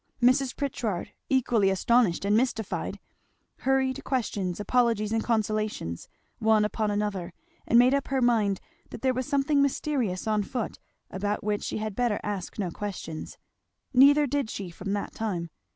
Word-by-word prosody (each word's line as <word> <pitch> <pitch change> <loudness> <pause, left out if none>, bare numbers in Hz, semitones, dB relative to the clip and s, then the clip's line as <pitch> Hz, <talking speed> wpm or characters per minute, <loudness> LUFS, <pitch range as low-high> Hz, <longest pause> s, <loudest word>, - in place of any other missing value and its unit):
Mrs. 255 +2 +3
Pritchard 235 -9 -3 0.2
equally 240 -6 +3
astonished 195 -1 +2
and 205 +1 +3
mystified, 225 -3 -1 0.6
hurried 265 0 +1
questions, 205 -8 -2
apologies, 225 -1 +1
and 225 0 +1
consolations, 215 - -1 0.3
one 220 -1 +4
upon 215 0 -1
another; 205 -4 -2 0.3
and 235 - +5
made 250 +2 +6
up 280 -1 0
her 270 -1 0
mind 220 -6 +2 0.3
that - - -9
there 260 -1 +3
was 255 +1 -3
something 285 0 +2
mysterious 265 -8 0
on 215 -1 +1
foot 225 +2 -4 0.3
about 205 +2 -2
which 205 0 0
she - - -3
had 215 -2 -4
better 240 -3 +1
ask 200 -4 -4
no 190 -5 -2
questions. 185 -5 -6 0.6
Neither 285 +3 +7
did 280 -3 -1
she, 190 -5 -5
from 195 +4 -4
that 205 - -3
time. 175 -7 -3
220 Hz, 150 wpm, -27 LUFS, 205-255 Hz, 0.6 s, Neither